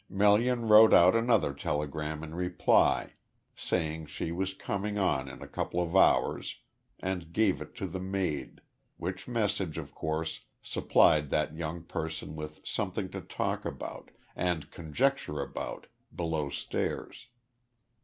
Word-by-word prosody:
Melian 110 Hz, +4 st, +3 dB
wrote 110 Hz, +1 st, +9 dB
out 90 Hz, +4 st, +7 dB
another 115 Hz, -10 st, +3 dB
telegram 75 Hz, +2 st, -3 dB
in 80 Hz, 0 st, -7 dB
reply, 90 Hz, +1 st, +2 dB, 0.4 s
saying 80 Hz, -2 st, -2 dB
she 80 Hz, -, -4 dB
was 95 Hz, +2 st, -2 dB
coming 100 Hz, +2 st, -3 dB
on 70 Hz, -9 st, +1 dB
in 70 Hz, -, -9 dB
a -, -, -9 dB
couple 90 Hz, -, -2 dB
of 85 Hz, +1 st, -1 dB
hours, 95 Hz, -, +3 dB, 0.4 s
and 90 Hz, -3 st, -3 dB
gave 105 Hz, 0 st, +2 dB
it -, -, -9 dB
to -, -, -4 dB
the 95 Hz, -, -4 dB
maid, 95 Hz, -6 st, -3 dB, 0.4 s
which -, -, -5 dB
message 105 Hz, -8 st, -1 dB
of -, -, -6 dB
course 80 Hz, +1 st, -3 dB, 0.2 s
supplied 75 Hz, -3 st, +3 dB
that 75 Hz, +2 st, 0 dB
young 80 Hz, +1 st, -4 dB
person 80 Hz, -1 st, -5 dB
with 75 Hz, 0 st, -8 dB
something -, -, -2 dB
to -, -, -5 dB
talk -, -, -2 dB
about, -, -, -6 dB, 0.3 s
and 85 Hz, -5 st, -1 dB
conjecture 85 Hz, -, 0 dB
about, -, -, -5 dB, 0.3 s
below 80 Hz, -4 st, -1 dB
stairs. 70 Hz, -, -4 dB
85 Hz, 135 wpm, -30 LUFS, 75-100 Hz, 0.4 s, wrote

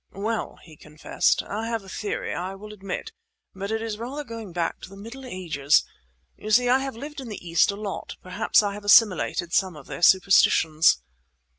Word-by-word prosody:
"Well," 220 Hz, +2 st, -3 dB
he 155 Hz, -3 st, -15 dB
confessed, 150 Hz, +1 st, 0 dB
"I 220 Hz, +3 st, -4 dB
have 230 Hz, -3 st, -3 dB
a -, -, -15 dB
theory, 205 Hz, +2 st, -4 dB
I 185 Hz, +2 st, -4 dB
will 210 Hz, +2 st, -10 dB
admit; 195 Hz, -, -6 dB, 0.4 s
but 195 Hz, +1 st, -5 dB
it 220 Hz, 0 st, -2 dB
is 220 Hz, -2 st, -4 dB
rather 265 Hz, +6 st, -5 dB
going 230 Hz, -6 st, -8 dB
back 170 Hz, -1 st, -2 dB
to -, -, -10 dB
the 195 Hz, -, -13 dB
Middle 240 Hz, +6 st, -9 dB
Ages. 155 Hz, -, +1 dB, 0.5 s
You 215 Hz, -, -8 dB
see, 245 Hz, +3 st, +4 dB
I 255 Hz, +2 st, +5 dB
have 270 Hz, -2 st, -4 dB
lived 290 Hz, +4 st, -8 dB
in 250 Hz, -, -8 dB
the 200 Hz, -4 st, -8 dB
East 165 Hz, 0 st, +3 dB
a 200 Hz, -, -1 dB
lot; 205 Hz, -1 st, -6 dB
perhaps 185 Hz, +3 st, +2 dB
I 200 Hz, -1 st, -1 dB
have 205 Hz, +1 st, -9 dB
assimilated 205 Hz, -5 st, +4 dB
some 185 Hz, -3 st, +1 dB
of 145 Hz, -3 st, -12 dB
their -, -, -8 dB
superstitions." 165 Hz, -, +4 dB
200 Hz, 195 wpm, -25 LUFS, 180-225 Hz, 0.5 s, I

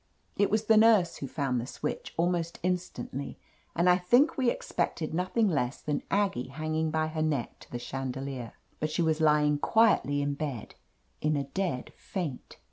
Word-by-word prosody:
It 200 Hz, -, +2 dB
was 215 Hz, +1 st, +1 dB
the 220 Hz, 0 st, +5 dB
nurse 215 Hz, -6 st, +5 dB
who 140 Hz, -, -5 dB
found 130 Hz, -3 st, -1 dB
the 120 Hz, -, -6 dB
switch 150 Hz, -, -5 dB
almost 170 Hz, 0 st, 0 dB
instantly, 175 Hz, -7 st, -3 dB, 0.4 s
and 170 Hz, +2 st, +2 dB
I 180 Hz, 0 st, +5 dB
think 245 Hz, -, +4 dB
we 255 Hz, -3 st, +2 dB
ex -, -, -5 dB
pected 155 Hz, -2 st, -1 dB
nothing 185 Hz, +6 st, +1 dB
less 140 Hz, -7 st, 0 dB
than 150 Hz, -1 st, -2 dB
Aggie 195 Hz, -11 st, +1 dB
hanging 155 Hz, +3 st, -2 dB
by 155 Hz, 0 st, +1 dB
her 155 Hz, 0 st, -3 dB
neck 150 Hz, -6 st, -1 dB
to -, -, -16 dB
the 120 Hz, -, -3 dB
chandelier. 130 Hz, -1 st, -5 dB, 0.3 s
But 155 Hz, -, -1 dB
she 170 Hz, +3 st, 0 dB
was 160 Hz, -1 st, +1 dB
lying 150 Hz, -1 st, +4 dB
quietly 145 Hz, -10 st, +3 dB
in 145 Hz, 0 st, 0 dB
bed, 140 Hz, -6 st, -5 dB, 0.5 s
in 155 Hz, 0 st, +1 dB
a 140 Hz, -, 0 dB
dead 165 Hz, -2 st, -3 dB
faint. 160 Hz, -9 st, -5 dB
155 Hz, 180 wpm, -29 LUFS, 140-180 Hz, 0.5 s, the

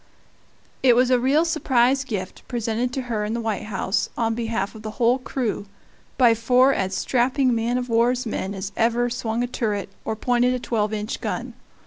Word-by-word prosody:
It 250 Hz, -3 st, +5 dB
was 250 Hz, +1 st, +3 dB
a 250 Hz, -, +4 dB
real 280 Hz, +6 st, +3 dB
surprise 265 Hz, -5 st, +2 dB
gift, 200 Hz, -8 st, -5 dB
presented 235 Hz, 0 st, -1 dB
to 265 Hz, -, -2 dB
her 225 Hz, -4 st, -2 dB
in 215 Hz, +2 st, -2 dB
the -, -, -2 dB
White 220 Hz, -4 st, -2 dB
House, 195 Hz, -1 st, -1 dB
on 225 Hz, -1 st, +1 dB
behalf 225 Hz, -3 st, -2 dB
of 220 Hz, -, -11 dB
the 215 Hz, -, -5 dB
whole 245 Hz, +1 st, +3 dB
crew, 245 Hz, -5 st, -3 dB, 0.5 s
by 240 Hz, -3 st, +6 dB
four 250 Hz, +4 st, +4 dB
as 190 Hz, -3 st, -1 dB
strapping 255 Hz, +2 st, +1 dB
man 230 Hz, +2 st, 0 dB
of 250 Hz, 0 st, -3 dB
war's 245 Hz, +2 st, +2 dB
men 200 Hz, -3 st, -3 dB
as 195 Hz, +1 st, -5 dB
ever 240 Hz, +1 st, +1 dB
swung 235 Hz, -1 st, -2 dB
a -, -, -1 dB
turret 210 Hz, -6 st, -2 dB
or 220 Hz, -, -2 dB
pointed 245 Hz, +2 st, +2 dB
a -, -, -3 dB
twelve 215 Hz, -3 st, -1 dB
inch 215 Hz, +1 st, -4 dB
gun. -, -, -3 dB
235 Hz, 190 wpm, -23 LUFS, 220-250 Hz, 0.5 s, by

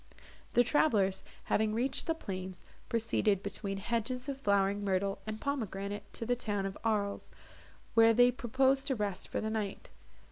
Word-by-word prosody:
The 245 Hz, -, +6 dB
travellers, 205 Hz, -9 st, +2 dB, 0.2 s
having 215 Hz, 0 st, +1 dB
reached 260 Hz, +4 st, -1 dB
the 325 Hz, -, +1 dB
plains, 185 Hz, -, -6 dB, 0.3 s
proceeded, 220 Hz, -4 st, +1 dB
between 200 Hz, 0 st, -4 dB
hedges 235 Hz, +5 st, -2 dB
of 275 Hz, -1 st, -4 dB
flowering 200 Hz, -1 st, +2 dB
myrtle 195 Hz, 0 st, 0 dB
and 215 Hz, 0 st, -4 dB
pomegranate, 205 Hz, -7 st, -3 dB
to 230 Hz, -, -4 dB
the 245 Hz, +2 st, +2 dB
town 205 Hz, -5 st, -2 dB
of 195 Hz, 0 st, -4 dB
Arles, 210 Hz, -3 st, -1 dB, 0.6 s
where 225 Hz, 0 st, +7 dB
they 245 Hz, +2 st, +6 dB
proposed 265 Hz, +2 st, +1 dB
to 265 Hz, -, +1 dB
rest 205 Hz, -4 st, -3 dB
for -, -, -2 dB
the 220 Hz, -, -2 dB
night. 210 Hz, -3 st, -4 dB
215 Hz, 155 wpm, -32 LUFS, 200-245 Hz, 0.6 s, where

